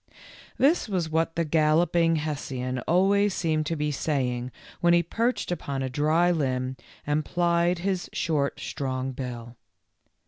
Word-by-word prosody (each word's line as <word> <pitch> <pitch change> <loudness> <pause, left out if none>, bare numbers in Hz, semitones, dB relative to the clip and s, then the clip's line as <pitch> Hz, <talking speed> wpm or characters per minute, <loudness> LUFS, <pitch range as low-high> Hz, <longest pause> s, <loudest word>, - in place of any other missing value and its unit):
This 280 -2 +3
was 175 -5 -1
what 165 0 0
the 165 0 0
Galloping 165 +2 +3
Hessian 135 -5 -3
always 195 +3 +3
seemed 155 -3 0
to 165 - -1
be 150 -1 -1
saying 130 -4 -1 0.3
when 175 -1 +4
he 170 0 +4
perched 235 -1 -1
upon 140 -6 -3
a 130 - -3
dry 155 +6 +3
limb 130 -5 -1 0.3
and 150 +1 0
plied 175 +1 +1
his 185 +1 -2
short, 145 -4 -1
strong 130 -1 -3
bill. 120 -2 -7
155 Hz, 140 wpm, -26 LUFS, 135-175 Hz, 0.3 s, when